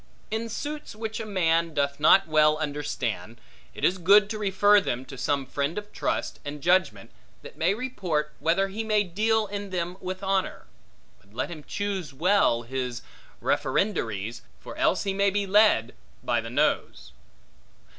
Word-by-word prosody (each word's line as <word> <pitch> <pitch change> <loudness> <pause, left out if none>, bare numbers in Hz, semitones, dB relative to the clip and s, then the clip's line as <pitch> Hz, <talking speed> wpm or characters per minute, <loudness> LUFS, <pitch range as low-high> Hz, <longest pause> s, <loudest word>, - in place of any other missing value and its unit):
In 225 +1 -2
suits 295 +2 -5
which 220 0 -5
a 220 - -5
man 165 -4 +1
doth 140 0 0
not 190 +5 +6
well 155 -1 +4
understand, 145 -6 -4 0.4
it - - -1
is 185 +1 +2
good 205 +4 +5
to 215 - -4
refer 205 0 +4
them 125 -6 -3
to 135 - -10
some 135 +1 -1
friend 140 +6 -2
of 210 0 -6
trust - - -2
and 145 +1 -6
judgment, 180 +1 +1 0.3
that - - -11
may 180 +5 +1
report, 185 -12 -2
whether 190 +4 +1
he 215 +3 -4
may 215 -1 +2
deal 215 +4 +1
in 200 0 -6
them 180 0 -3
with 185 +1 -5
honor: 195 -1 -1 0.5
but 100 +2 -24
let 125 - -2
him 155 -3 -8
choose 190 -8 -4
well 170 -7 +3
his 125 -1 -4 0.4
referendaries, 115 - -1 0.2
for - - -10
else 185 - +1
he 195 -1 -1
may 200 +1 +2
be 200 +1 -1
led 195 - +4 0.3
by 120 -1 +1
the 115 - -7
nose. 65 - -1
180 Hz, 165 wpm, -26 LUFS, 140-205 Hz, 0.5 s, not